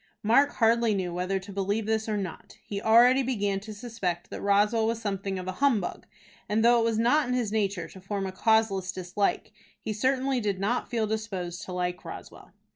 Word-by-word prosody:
Mark 275 +7 +4
hardly 230 -1 +3
knew 180 -3 -2
whether 180 +2 -1
to 195 +1 -8
believe 200 +3 -1
this 220 0 -1
or 210 - 0
not. 185 -5 -7
He 200 -1 -4
already 240 +4 +6
began 205 -6 -1
to 215 +2 -9
suspect 205 -6 -4
that - - -6
Roswell 210 +3 +3
was 230 0 -1
something 195 -3 -3
of 185 0 -6
a - - -1
humbug, 235 -10 +1 0.4
and 220 +2 +2
though 240 0 +6
it - - +2
was 225 -1 +1
not 245 +7 +3
in 250 - 0
his 235 -5 -1
nature 200 -5 -1
to 190 - -13
form 195 +1 -3
a 190 - -3
causeless 195 -2 +1
dislike, 185 +2 -2 0.3
he 215 - -4
certainly 260 +4 +1
did 205 -4 -1
not 215 +6 -1
feel 230 -2 0
disposed 195 -5 -4
to - - -8
like 180 0 -2
Roswell. - - -10
210 Hz, 200 wpm, -27 LUFS, 195-230 Hz, 0.4 s, already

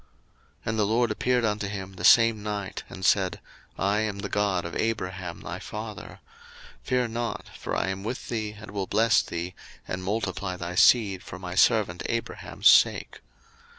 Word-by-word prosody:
01:026:024 - - -34 0.6
And 110 0 -1
the 105 - +3
LORD 115 +1 +2
appeared 125 +2 +1
unto 105 -1 -1
him 95 -1 -6
the - - -9
same 115 -2 +6
night, 105 -2 -4
and 95 - -6
said, 95 -2 +2 0.4
I 100 +2 +1
am 110 -2 -2
the 100 0 -5
God 100 -4 0
of 85 - -6
Abraham 90 -6 -3
thy 90 +1 -6
father: 105 0 -8 0.6
fear 125 -2 0
not, 115 +1 -4
for - - -4
I - - 0
am 95 0 -4
with 120 +4 -5
thee, 110 -2 -3
and 105 -2 -10
will 100 -2 -3
bless 110 +1 +4
thee, 85 +2 -5 0.3
and 95 0 -4
multiply 95 -2 -2
thy 85 0 -5
seed 100 -1 +5
for 95 - -9
my 90 -1 -6
servant 95 -2 +3
Abraham's 115 0 -1
sake. - - +5
105 Hz, 175 wpm, -26 LUFS, 95-110 Hz, 0.6 s, same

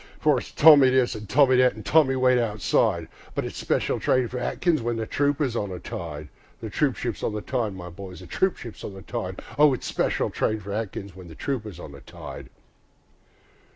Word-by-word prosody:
For 150 -4 +3
it's - - -10
Tommy 145 -4 +7
this, 130 -2 +2
an' 105 -1 -8
Tommy 130 +2 +4
that, 125 0 +4
an' 110 - -9
"Tommy, 135 +4 +4
wait 125 -1 +3
outside"; 105 -4 +1 0.3
But - - -1
it's - - -6
"Special - - 0
train 130 -1 +2
for 125 - -4
Atkins" 160 +4 0
when 120 0 -1
the 115 -1 -3
trooper's 145 0 0
on 105 -3 -2
the 90 - -5
tide, 75 -4 -7 0.3
The - - -7
troopship's - - -1
on - - -1
the 105 - -3
tide, 115 -6 -2
my 90 -1 -8
boys, 90 +1 -9
the 90 - -11
troopship's 125 - -2
on 100 - -6
the 95 - -10
tide, 100 -5 -5 0.2
O 150 -3 +6
it's - - -9
"Special - - 0
train 110 0 0
for 100 0 -7
Atkins" 100 -3 -5
when 90 -2 -11
the 80 - -11
trooper's 110 - -4
on 75 - -9
the 70 -1 -12
tide. - - -10
115 Hz, 205 wpm, -25 LUFS, 95-130 Hz, 0.3 s, Tommy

